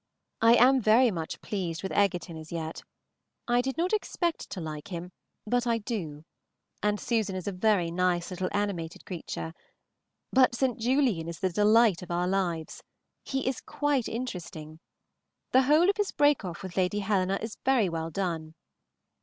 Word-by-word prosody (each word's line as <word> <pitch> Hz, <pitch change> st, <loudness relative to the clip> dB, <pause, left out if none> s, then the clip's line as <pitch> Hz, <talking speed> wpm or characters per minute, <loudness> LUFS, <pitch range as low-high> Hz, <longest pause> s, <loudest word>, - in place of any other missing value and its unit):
I 230 Hz, +1 st, +7 dB
am 260 Hz, +2 st, +5 dB
very 225 Hz, +3 st, +5 dB
much 165 Hz, -4 st, -5 dB
pleased 175 Hz, -5 st, -3 dB
with 190 Hz, -, -3 dB
Egerton 180 Hz, -4 st, +1 dB
as 155 Hz, 0 st, -10 dB
yet. 165 Hz, -1 st, -4 dB, 0.7 s
I 240 Hz, 0 st, +3 dB
did 265 Hz, +3 st, -3 dB
not 355 Hz, +5 st, 0 dB
expect 350 Hz, -5 st, -1 dB
to 190 Hz, -, -5 dB
like 155 Hz, -1 st, -6 dB
him, 180 Hz, -1 st, -6 dB, 0.3 s
but 245 Hz, +2 st, 0 dB
I 230 Hz, -1 st, +2 dB
do, 170 Hz, -10 st, -5 dB, 0.6 s
and 210 Hz, 0 st, +1 dB
Susan 220 Hz, -5 st, -1 dB
is 185 Hz, 0 st, -5 dB
a -, -, 0 dB
very 185 Hz, -3 st, +1 dB
nice 180 Hz, 0 st, 0 dB
little 185 Hz, 0 st, -2 dB
animated 185 Hz, -6 st, -3 dB
creature; 165 Hz, -2 st, -5 dB, 0.8 s
but 255 Hz, -2 st, +5 dB
St. 250 Hz, -2 st, 0 dB
Julian 240 Hz, -, +1 dB
is 170 Hz, 0 st, -6 dB
the 185 Hz, -, 0 dB
delight 210 Hz, 0 st, +4 dB
of 180 Hz, -, -9 dB
our 175 Hz, +1 st, 0 dB
lives. 175 Hz, -4 st, -2 dB, 0.4 s
He 270 Hz, -1 st, -2 dB
is 260 Hz, -2 st, -1 dB
quite 290 Hz, -4 st, 0 dB
interesting. 170 Hz, -10 st, -6 dB, 0.7 s
The 260 Hz, -, +6 dB
whole 300 Hz, +6 st, +4 dB
of 400 Hz, -, +2 dB
his 415 Hz, -2 st, 0 dB
break 290 Hz, -4 st, +3 dB
off 175 Hz, -1 st, -6 dB
with 185 Hz, -1 st, -8 dB
Lady 185 Hz, +2 st, +1 dB
Helena 195 Hz, -1 st, +1 dB
is 225 Hz, 0 st, -6 dB
very 255 Hz, -6 st, +3 dB
well 165 Hz, -1 st, -3 dB
done. 165 Hz, -3 st, -3 dB
195 Hz, 170 wpm, -28 LUFS, 170-245 Hz, 0.8 s, I